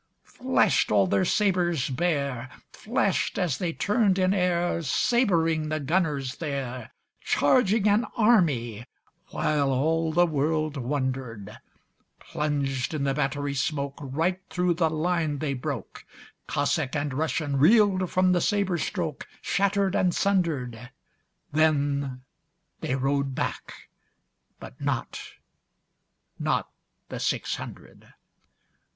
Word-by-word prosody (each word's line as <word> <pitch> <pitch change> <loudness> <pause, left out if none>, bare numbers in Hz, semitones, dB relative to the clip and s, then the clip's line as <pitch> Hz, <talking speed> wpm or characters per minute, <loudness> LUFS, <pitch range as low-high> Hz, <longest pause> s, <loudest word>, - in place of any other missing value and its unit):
Flash'd 255 - +1
all 100 -2 +4
their 95 +1 +1
sabres 175 -9 +1
bare, 140 -4 -1 0.2
Flash'd - - -1
as 165 -7 0
they 175 -3 -1
turn'd 205 +1 +1
in 185 0 +2
airSabring 175 - +1
the 155 0 -1
gunners 145 -4 -1
there, 135 -6 -4 0.3
Charging 210 - +3
an 210 +3 +3
army, 145 - +2 0.5
whileAll 155 +3 +1
the 175 +2 +4
world 155 0 0
wonder'd:Plunged 130 +2 -4
in 145 - -2
the 135 -1 +1
battery 145 0 -1
smokeRight 140 +5 -2
thro' 180 -1 +1
the 165 -1 +1
line 160 -1 0
they 140 -1 -2
broke; 130 -4 -5 0.4
Cossack 145 0 0
and 145 -1 -1
RussianReel'd 160 - +2
from 185 0 +3
the 175 -1 +2
sabre 195 -4 +1
strokeShatter'd 195 +4 -1
and 180 -3 +2
sunder'd. 140 - -1 0.6
Then 140 -4 +1 0.6
they 130 - -2
rode 135 0 0
back, - - -5 0.7
but - - -11
notNot - - -2 2.0
the - - -5
six - - -1
hundred. - - -11
155 Hz, 100 wpm, -26 LUFS, 135-180 Hz, 2.0 s, all